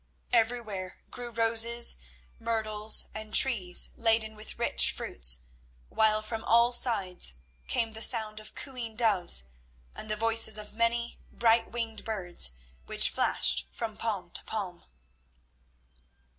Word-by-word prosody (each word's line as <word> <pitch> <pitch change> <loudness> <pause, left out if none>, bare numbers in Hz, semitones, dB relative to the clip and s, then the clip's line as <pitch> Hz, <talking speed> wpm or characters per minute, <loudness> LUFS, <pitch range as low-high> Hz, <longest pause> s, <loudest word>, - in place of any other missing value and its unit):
Everywhere 225 -5 -2
grew 245 -1 -9
roses, 230 - +3 0.4
myrtles, 220 -2 +2
and 215 0 -6
trees 190 -9 +4
laden 225 -1 -1
with 215 +1 -9
rich 235 - +3
fruits, - - +3 0.5
while 215 0 +1
from 220 +1 -6
all 235 +1 +3
sides 190 - 0 0.3
came 225 - -1
the 220 0 -7
sound 220 -2 +3
of 215 0 -11
cooing 245 -5 -6
doves 205 - +2 0.5
and 215 - -10
the 215 - -2
voices 225 0 +2
of 210 0 -7
many 230 +1 -2
bright 230 0 +1
winged 225 -2 -6
birds 175 - -2 0.3
which - - +4
flashed 65 +3 +2
from 225 -2 -7
palm 200 -7 -5
to - - +1
palm. 190 -5 -7
220 Hz, 125 wpm, -27 LUFS, 210-230 Hz, 0.5 s, trees